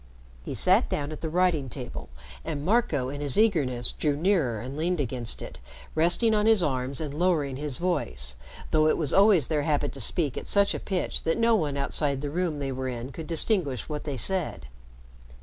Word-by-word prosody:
He - - -5
sat - - +3
down 145 +1 -3
at 155 - -8
the 160 - -3
writing 165 -5 +1
table 125 -1 -7 0.3
and 145 0 -5
Marco, 180 - +1
in 145 +1 -6
his 145 -3 +6
eagerness, 145 - +2
drew 150 -2 -1
nearer 155 - +1
and 130 +4 -7
leaned 170 +3 -1
against 125 -3 -3
it, - - -10 0.3
resting 175 +8 +2
on 210 0 +2
his 220 -5 +5
arms 130 -2 -2
and 150 -3 -4
lowering 150 -5 0
his 145 -2 -3
voice, 65 - -1 0.4
though 155 0 +3
it - - +2
was 150 -4 0
always 195 -7 +5
their 150 0 -1
habit 145 -1 0
to 135 - -8
speak 145 +4 +3
at - - -12
such 200 -1 +3
a - - -4
pitch 190 -3 -3
that 165 - -1
no 230 0 +3
one 150 -9 0
outside 140 0 -1
the 145 -1 -4
room 170 -2 -2
they 140 -1 -3
were 130 0 -4
in 125 +1 -5
could 155 +4 -8
distinguish 165 - +1
what 150 -1 -5
they 145 -3 -4
said. 180 - +2
150 Hz, 200 wpm, -26 LUFS, 135-180 Hz, 0.4 s, his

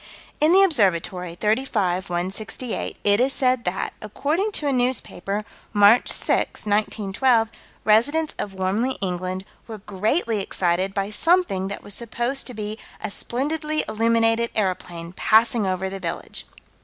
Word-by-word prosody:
In 305 +2 +4
the 385 +2 +7
Observatory, 185 - +1
35 210 -4 0
168, 200 +7 -4
it 205 +1 +4
is 260 +2 +3
said 255 -3 +1
that, 180 +2 -2
according 305 - -1
to 300 - +1
a - - +2
newspaper, 220 -5 -1 0.3
March 205 +3 +5
6, - - 0
1912, 215 +3 +1 0.3
residents 290 +9 +3
of 200 - -4
Warmley, 205 +8 0
England, 185 0 -3 0.2
were 225 -2 -7
greatly 210 - 0
excited 185 +1 0
by 200 +1 -1
something 325 - +2
that 200 - -6
was 205 - -3
supposed 240 +4 -1
to 250 - -7
be 215 +1 -5 0.2
"a - - -4
splendidly 300 +7 -1
illuminated 230 +1 +2
aeroplane, 180 -4 -2
passing 220 +1 +3
over 185 0 -1
the 195 0 -6
village." 170 -3 -5
215 Hz, 135 wpm, -23 LUFS, 190-250 Hz, 0.3 s, the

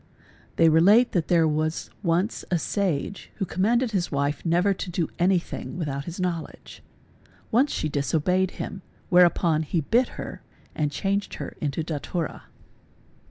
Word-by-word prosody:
They 165 - +5
relate 195 +10 +5
that 170 -4 0
there 165 -2 +4
was 155 +1 -1
once 180 +3 0
a 175 - +2
sage 190 0 -2
who 195 - -2
commanded 230 +7 +1
his 185 -4 -1
wife. 140 0 -1
_ - - -27
never 180 +4 +3
to 185 - -6
do 170 -2 -1
anything 175 0 0
without 140 -4 -3
his 170 +2 -7
knowledge. 175 -3 -4 0.7
Once 260 +5 +3
she - - -1
disobeyed 160 +6 +1
him: 195 - -5
_ - - -33 0.2
whereupon 175 -3 +4
he 160 +2 -1
bit 235 - +2
her - - -7 0.3
and 150 -2 0
changed 200 +6 -1
her - - -7
into 150 +2 -1
datura. 160 +1 -4
175 Hz, 155 wpm, -25 LUFS, 155-195 Hz, 0.7 s, They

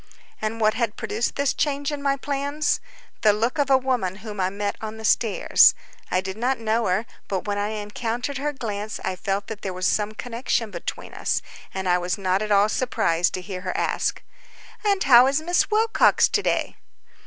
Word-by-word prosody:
And 220 +1 -2
what 215 -1 +3
had 230 -2 -1
produced 225 +3 -2
this 280 -1 +1
change 285 0 -1
in 290 -1 -4
my 275 -1 +2
plans? 285 +2 -1 0.4
The 210 -1 +5
look 230 +7 -1
of 280 -1 +2
a 265 - +6
woman 250 -8 -1
whom 210 -2 -6
I 185 0 +2
met 200 +1 -3
on 220 0 -6
the 220 - -6
stairs. 215 0 +5 0.3
I 185 - +1
did 190 +1 -6
not 255 +3 0
know 225 0 0
her, 190 +5 +1 0.2
but 190 -2 -2
when 205 -1 -1
I 205 - 0
encountered 225 +5 -3
her 295 +2 -1
glance 215 -5 -5
I 185 - -2
felt 195 +2 -2
that 215 -1 -7
there 190 - -4
was 185 0 -3
some 210 +2 +1
connection 230 -1 -2
between 170 -2 -6
us, - - -1 0.3
and 190 -1 -4
I 180 0 +3
was 180 +2 -2
not 190 0 0
at 215 0 -3
all 200 0 +5
surprised 175 -8 +1
to 185 - -4
hear 185 -1 -6
her 185 -1 -3
ask: - - -1 0.6
"And 400 -2 +2
how 250 -1 +8
is 275 +2 +2
Miss 350 +3 +1
Wilcox 445 +1 +4
to - - +1
day?" - - -1
220 Hz, 200 wpm, -24 LUFS, 200-265 Hz, 0.6 s, how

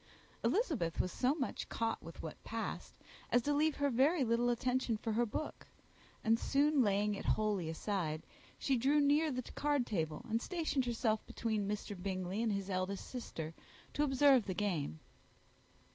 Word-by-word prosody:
Elizabeth 275 - +1
was 180 - +1
so 260 +3 +1
much 275 -5 -3
caught 225 0 -1
by - - -7
what 160 - -8
passed, 225 0 -4 0.4
as 245 - +4
to 290 - +1
leave 305 +1 +2
her 285 -1 +1
very 275 +6 +4
little 235 0 +2
attention 250 -1 +1
for 225 +1 -3
her 240 +2 +2
book; 265 +8 -5 0.6
and, 225 +1 +3
soon 285 0 +3
laying 205 -1 +2
it 200 - -5
wholly 205 -6 +1
aside, 160 -2 -2 0.3
she 270 -2 +1
drew 275 +5 +3
near 295 +2 +4
the 255 -1 -2
card 290 -3 +1
table, 160 -8 -2
and 225 +1 0
stationed 315 -6 -1
herself 225 -2 0
between 215 -3 -1
Mr. 205 0 -3
Bingley 185 +2 -2
and 230 -2 +1
his 200 -1 -2
eldest 185 0 -2
sister, 165 -10 -5 0.4
to - - 0
observe 270 -4 +5
the 185 - -2
game. 170 - -1
230 Hz, 165 wpm, -35 LUFS, 200-270 Hz, 0.6 s, observe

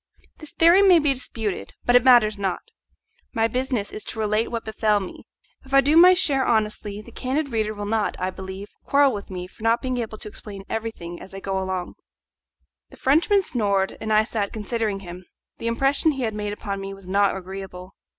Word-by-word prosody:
This 310 -2 -11
theory 340 +4 +6
may 380 -3 +7
be 295 -3 +2
disputed, 225 -6 -4
but 245 - +3
it 245 - +6
matters 240 -5 +6
not. 190 -2 -2 0.7
My 225 0 +2
business 250 -3 -2
is 215 - -6
to - - -6
relate 215 +1 0
what 230 -1 -4
befell 215 -1 +1
me; 190 - -9 0.4
if 270 0 -3
I 275 - +8
do 290 +4 +2
my 360 +2 +8
share 285 -7 +2
honestly 215 -3 -1
the 235 - -14
candid 275 +4 -2
reader 215 -1 -1
will 205 0 -5
not, 215 0 -1
I 185 +1 -1
believe, 190 +2 -8
quarrel 280 -2 +3
with 205 -1 -6
me 180 -2 -5
for 185 - -18
not 225 +1 +2
being 255 -1 -3
able 225 -2 -4
to 215 - -9
explain 205 -2 -9
everything 220 -7 -5
as 195 - -11
I - - -5
go 195 0 -2
along. 185 -1 -3 1.0
The - - -15
Frenchman 340 +9 +3
snored, 200 - 0
and 220 - -3
I 215 0 +5
sat 215 -3 -3
considering 215 -2 -2
him. 180 -1 -9 0.4
The 230 - -4
impression 275 +6 +2
he 270 -2 -4
had 220 -2 -1
made 210 -1 -3
upon 200 -1 -5
me 195 0 -6
was 195 -2 -13
not 200 +1 +2
agreeable. 190 0 -8
215 Hz, 205 wpm, -23 LUFS, 195-255 Hz, 1.0 s, I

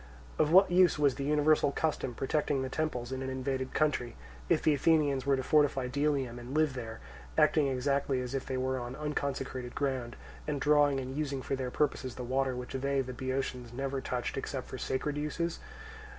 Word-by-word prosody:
Of 150 - +3
what 190 +1 +7
use 180 -2 +5
was 145 -3 +3
the 140 - -5
universal 150 0 +3
custom 140 -5 -1
protecting 140 0 0
the 130 - -3
temples 130 -5 -2
in 130 0 -3
an 130 - -3
invaded 130 0 -3
country, 145 -6 +1 0.3
if - - +3
the 155 - +4
Athenians 145 -2 +2
were 140 - +4
to 130 - -2
fortify 145 -2 +3
Delium 135 -2 0
and 125 +4 -7
live 155 -3 +3
there, 115 -3 -6 0.4
acting 155 -1 +4
exactly 135 0 0
as 125 0 -4
if 135 - -3
they 130 - -2
were 130 0 -1
on 120 +1 -6
unconsecrated 135 -4 -3
ground, 130 -4 -2 0.3
and 145 -2 -1
drawing 145 -1 +4
and 130 0 -5
using 140 -3 -2
for 135 - -1
their 130 -1 -3
purposes 130 -2 -1
the 125 - -5
water 130 +1 0
which 125 0 -6
they, 135 +1 0
the 130 -1 -5
Boeotians, 130 -2 -3
never 135 +1 -2
touched 125 -2 -3
except - - -4
for - - -7
sacred 145 +3 -2
uses? 165 +3 -2
135 Hz, 195 wpm, -31 LUFS, 130-150 Hz, 0.4 s, what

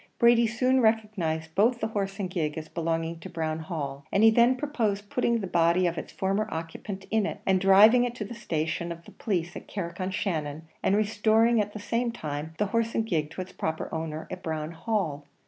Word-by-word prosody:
Brady 235 0 +5
soon 255 +3 +2
recognised 195 -8 0
both 230 +6 +3
the 220 - -1
horse 195 -2 -3
and 195 - -1
gig 165 -4 -2
as 155 0 -5
belonging 165 0 -2
to - - -9
Brown 160 -1 -2
Hall; 145 -5 -5
and 200 - +3
he 225 - +8
then 235 +3 +5
proposed 220 -8 -2
putting 235 -2 +1
the - - -2
body 175 0 +3
of 170 -1 0
its 160 - -6
former 195 +3 0
occupant 190 +4 -6
in 215 -2 +2
it, - - -5
and 190 -1 +3
driving 210 +6 +7
it 245 -1 -2
to 215 - -4
the 215 - -7
station 170 -6 -2
of 170 0 -8
the - - -13
police 175 -5 -2
at - - -8
Carrick 185 -1 -5
on 185 - -1
Shannon, 160 -6 -2 0.2
and 195 - +2
restoring 220 +2 +3
at 205 0 -4
the 215 - -6
same 230 +3 -1
time 155 -6 -5
the 210 - +1
horse 230 0 +1
and 225 - +1
gig 155 -8 -1
to 185 - -6
its 185 - -8
proper 160 0 -3
owner 160 -1 -4
at - - -6
Brown 155 -1 -3
Hall. 165 -6 -2
195 Hz, 215 wpm, -27 LUFS, 160-220 Hz, 0.2 s, he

